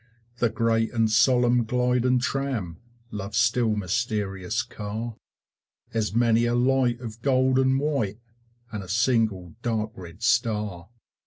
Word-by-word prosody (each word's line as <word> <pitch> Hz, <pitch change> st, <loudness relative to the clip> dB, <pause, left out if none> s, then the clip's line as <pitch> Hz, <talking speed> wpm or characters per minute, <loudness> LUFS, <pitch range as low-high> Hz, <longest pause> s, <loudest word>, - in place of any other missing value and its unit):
The 120 Hz, -2 st, +2 dB
great 115 Hz, 0 st, +1 dB
and 115 Hz, -2 st, +2 dB
solemn 120 Hz, +1 st, +4 dB
gliding 125 Hz, +2 st, +1 dB
tram, 125 Hz, -9 st, -2 dB, 0.3 s
Love's 105 Hz, 0 st, -4 dB
still 115 Hz, -1 st, +2 dB
mysterious 100 Hz, -2 st, -2 dB
car, 110 Hz, +2 st, -6 dB, 0.8 s
Has 110 Hz, -2 st, -1 dB
many 115 Hz, 0 st, +3 dB
a 120 Hz, 0 st, +1 dB
light 125 Hz, -1 st, +2 dB
of 115 Hz, -1 st, -8 dB
gold 130 Hz, 0 st, +2 dB
and 130 Hz, 0 st, +3 dB
white, 135 Hz, -9 st, -1 dB, 0.5 s
And 105 Hz, -, -4 dB
a 95 Hz, -, -12 dB
single 110 Hz, -6 st, +1 dB
dark 110 Hz, -2 st, -1 dB
red 90 Hz, +2 st, -11 dB
star. 105 Hz, -6 st, 0 dB
115 Hz, 130 wpm, -25 LUFS, 105-125 Hz, 0.8 s, solemn